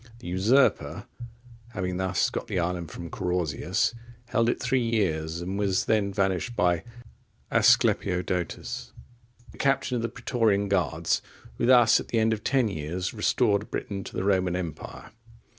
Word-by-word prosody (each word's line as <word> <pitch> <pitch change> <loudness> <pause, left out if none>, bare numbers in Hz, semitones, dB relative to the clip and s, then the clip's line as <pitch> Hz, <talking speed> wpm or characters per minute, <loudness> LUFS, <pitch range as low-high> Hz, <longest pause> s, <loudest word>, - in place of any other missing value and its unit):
(48) 115 - -19
The - - -9
usurper, 110 +10 +2 0.7
having 90 -1 -2
thus 95 0 0
got - - -4
the - - -3
island 85 -1 -2
from 85 +1 -8
Carausius, 90 +2 -1 0.4
held 115 -1 +2
it - - -1
three 125 +1 +1
years, 85 -8 -1
and 95 +3 -3
was 95 -2 +1
then 105 -3 +1
vanquished 95 +4 -1
by 90 -3 +2 0.7
Asclepiodotus,(49) 115 +6 0
the - - -16
captain 135 -2 +1
of - - -2
the 115 - -2
Praetorian 115 -4 0
guards, 90 -8 +1 0.4
who - - +1
thus 120 -3 +6
at - - -7
the 115 - -1
end 110 0 +3
of 110 - -5
ten 130 -3 +2
years 90 0 -4
restored 100 0 +1
Britain 100 -2 -4
to - - -10
the - - -1
Roman 95 -3 +1
empire. 85 -4 -6
100 Hz, 155 wpm, -26 LUFS, 90-115 Hz, 0.7 s, thus